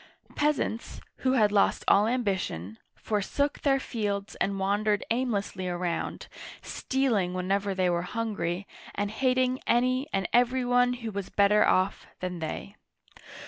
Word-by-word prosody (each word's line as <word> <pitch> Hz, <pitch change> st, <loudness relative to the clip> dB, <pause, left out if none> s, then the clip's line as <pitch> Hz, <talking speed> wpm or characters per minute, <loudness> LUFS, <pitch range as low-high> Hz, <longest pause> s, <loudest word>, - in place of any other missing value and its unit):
Peasants, 290 Hz, -6 st, -1 dB, 0.2 s
who 260 Hz, 0 st, +1 dB
had 215 Hz, -5 st, +4 dB
lost 205 Hz, -1 st, +2 dB
all 205 Hz, +2 st, +5 dB
ambition, 190 Hz, -, -2 dB, 0.2 s
forsook 220 Hz, +8 st, -1 dB
their 270 Hz, -2 st, +3 dB
fields 205 Hz, -5 st, -3 dB
and 195 Hz, 0 st, 0 dB
wandered 205 Hz, +2 st, +1 dB
aimlessly 210 Hz, -6 st, -1 dB
around, 175 Hz, -1 st, -3 dB, 0.4 s
stealing 225 Hz, -10 st, 0 dB
whenever 195 Hz, +2 st, 0 dB
they 185 Hz, -1 st, +2 dB
were 175 Hz, -1 st, +1 dB
hungry, 200 Hz, -3 st, -3 dB, 0.3 s
and 205 Hz, 0 st, -1 dB
hating 255 Hz, +2 st, +1 dB
any 255 Hz, +3 st, +2 dB
and 195 Hz, -1 st, 0 dB
every 245 Hz, +1 st, +3 dB
one 245 Hz, 0 st, +3 dB
who 230 Hz, -3 st, -5 dB
was 200 Hz, -2 st, -5 dB
better 205 Hz, +1 st, +4 dB
off 185 Hz, +1 st, +1 dB
than 180 Hz, -1 st, -4 dB
they. 155 Hz, -, -5 dB
210 Hz, 135 wpm, -28 LUFS, 190-245 Hz, 0.4 s, all